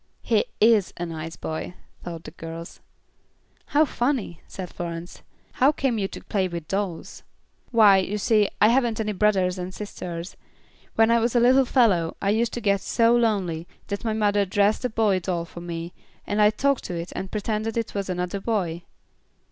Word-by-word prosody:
"He -, -, +2 dB
is 215 Hz, -3 st, +4 dB
a 175 Hz, -, -3 dB
nice 165 Hz, -1 st, -6 dB
boy," 160 Hz, +3 st, -5 dB, 0.3 s
thought 170 Hz, -2 st, -7 dB
the -, -, -9 dB
girls. 165 Hz, +1 st, -8 dB, 0.9 s
"How 300 Hz, +2 st, +4 dB
funny," 245 Hz, -, -2 dB
said 185 Hz, -3 st, -7 dB
Florence. 170 Hz, 0 st, -6 dB, 0.3 s
"How 265 Hz, +3 st, +4 dB
came 265 Hz, -6 st, -1 dB
you 195 Hz, -, 0 dB
to -, -, -10 dB
play 190 Hz, -3 st, 0 dB
with 170 Hz, -3 st, -6 dB
dolls?" 195 Hz, -4 st, -3 dB, 0.5 s
"Why, 215 Hz, -5 st, +6 dB
you 195 Hz, +2 st, -2 dB
see, 210 Hz, 0 st, +3 dB
I 215 Hz, -, +6 dB
haven't 235 Hz, -2 st, +2 dB
any 215 Hz, -1 st, -1 dB
brothers 190 Hz, -3 st, +1 dB
and 180 Hz, +1 st, -4 dB
sisters. 180 Hz, -3 st, -7 dB, 0.6 s
When 225 Hz, 0 st, +4 dB
I 235 Hz, -, +5 dB
was 235 Hz, +1 st, 0 dB
a -, -, +6 dB
little 255 Hz, +3 st, +5 dB
fellow 200 Hz, -11 st, +2 dB
I 200 Hz, -, +1 dB
used 230 Hz, +2 st, +1 dB
to 240 Hz, -, -4 dB
get 200 Hz, -2 st, +2 dB
so 230 Hz, 0 st, +3 dB
lonely, 190 Hz, -8 st, 0 dB, 0.2 s
that 200 Hz, -1 st, -3 dB
my 225 Hz, -2 st, 0 dB
mother 205 Hz, -1 st, +2 dB
dressed 200 Hz, +4 st, +1 dB
a 250 Hz, -, 0 dB
boy 215 Hz, -4 st, +2 dB
doll 175 Hz, -2 st, -2 dB
for 170 Hz, 0 st, -10 dB
me, 170 Hz, 0 st, -6 dB, 0.3 s
and 205 Hz, +1 st, 0 dB
I 210 Hz, -, +7 dB
talked 275 Hz, +5 st, 0 dB
to 180 Hz, -, -4 dB
it 170 Hz, +1 st, -5 dB
and 190 Hz, -, -4 dB
pretended 215 Hz, +2 st, -2 dB
it 230 Hz, -, -2 dB
was 200 Hz, -2 st, -3 dB
another 180 Hz, +2 st, -2 dB
boy." 190 Hz, -6 st, -1 dB
200 Hz, 185 wpm, -24 LUFS, 175-225 Hz, 0.9 s, I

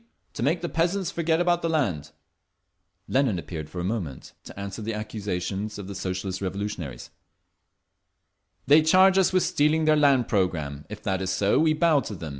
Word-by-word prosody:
To -, -, -6 dB
make 155 Hz, +8 st, +1 dB
the 175 Hz, -, -2 dB
peasants 175 Hz, +3 st, 0 dB
forget 165 Hz, -1 st, 0 dB
about 175 Hz, 0 st, +2 dB
the 165 Hz, -, -1 dB
land…." 95 Hz, -, -1 dB, 1.0 s
Lenin 130 Hz, -7 st, +1 dB
appeared 80 Hz, -3 st, -6 dB
for 90 Hz, -, -7 dB
a -, -, -2 dB
moment, 90 Hz, -, -4 dB
to -, -, -10 dB
answer 100 Hz, +2 st, -6 dB
the 110 Hz, +1 st, -3 dB
accusations 105 Hz, -1 st, -4 dB
of 100 Hz, -, -7 dB
the 100 Hz, -, -6 dB
Socialist 95 Hz, 0 st, -4 dB
Revolutionaries: 95 Hz, -9 st, -5 dB, 1.5 s
"They 150 Hz, +2 st, +6 dB
charge 185 Hz, +4 st, +5 dB
us 190 Hz, -, +3 dB
with 185 Hz, -1 st, +2 dB
stealing 155 Hz, +2 st, +2 dB
their 155 Hz, 0 st, +5 dB
land 140 Hz, -5 st, +3 dB
programme…. 80 Hz, -8 st, -1 dB
If 105 Hz, 0 st, -9 dB
that 95 Hz, -1 st, -1 dB
is 95 Hz, -, -2 dB
so, 100 Hz, +2 st, +2 dB
we 155 Hz, 0 st, +3 dB
bow 155 Hz, -1 st, +3 dB
to 110 Hz, -5 st, -6 dB
them. 80 Hz, -3 st, -7 dB
105 Hz, 180 wpm, -25 LUFS, 95-155 Hz, 1.5 s, They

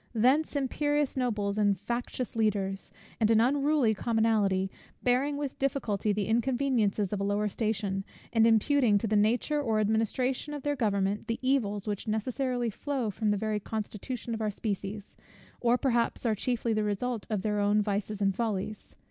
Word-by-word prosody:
Thence 265 Hz, +8 st, +3 dB
imperious 290 Hz, +1 st, 0 dB
nobles, 215 Hz, -5 st, -1 dB
and 200 Hz, -3 st, +2 dB
factious 240 Hz, +2 st, -3 dB
leaders; 200 Hz, -3 st, 0 dB, 0.3 s
and 220 Hz, -2 st, +3 dB
an 225 Hz, -1 st, +5 dB
unruly 275 Hz, -1 st, +3 dB
commonalty, 210 Hz, -4 st, +1 dB, 0.3 s
bearing 265 Hz, +4 st, +2 dB
with 285 Hz, -2 st, -4 dB
difficulty 235 Hz, -7 st, 0 dB
the 205 Hz, 0 st, 0 dB
inconveniences 235 Hz, -4 st, +1 dB
of 205 Hz, -, -1 dB
a -, -, 0 dB
lower 205 Hz, +1 st, +1 dB
station, 200 Hz, -2 st, -1 dB, 0.3 s
and 225 Hz, -1 st, +5 dB
imputing 230 Hz, 0 st, +4 dB
to 205 Hz, -, -2 dB
the 215 Hz, 0 st, +1 dB
nature 240 Hz, +8 st, +2 dB
or 225 Hz, -5 st, +1 dB
administration 235 Hz, +7 st, 0 dB
of 285 Hz, -, -7 dB
their 290 Hz, 0 st, 0 dB
government 205 Hz, -3 st, 0 dB
the 230 Hz, -1 st, -1 dB
evils 215 Hz, -7 st, 0 dB
which 205 Hz, +1 st, -3 dB
necessarily 245 Hz, +2 st, -1 dB
flow 260 Hz, -1 st, -2 dB
from 215 Hz, +2 st, -1 dB
the 205 Hz, -, +2 dB
very 215 Hz, 0 st, -1 dB
constitution 220 Hz, +3 st, -5 dB
of 225 Hz, -, -3 dB
our 215 Hz, -, +1 dB
species, 205 Hz, 0 st, -5 dB, 0.4 s
or 240 Hz, -1 st, +3 dB
which -, -, -4 dB
perhaps 240 Hz, -2 st, +1 dB
are 225 Hz, -, +3 dB
chiefly 230 Hz, +1 st, -1 dB
the 215 Hz, 0 st, +1 dB
result 210 Hz, +2 st, -2 dB
of 210 Hz, -4 st, -1 dB
their 210 Hz, -1 st, 0 dB
own 205 Hz, +1 st, +3 dB
vices 205 Hz, 0 st, -2 dB
and 195 Hz, -1 st, +2 dB
follies. 215 Hz, -2 st, -3 dB
220 Hz, 170 wpm, -29 LUFS, 205-250 Hz, 0.4 s, an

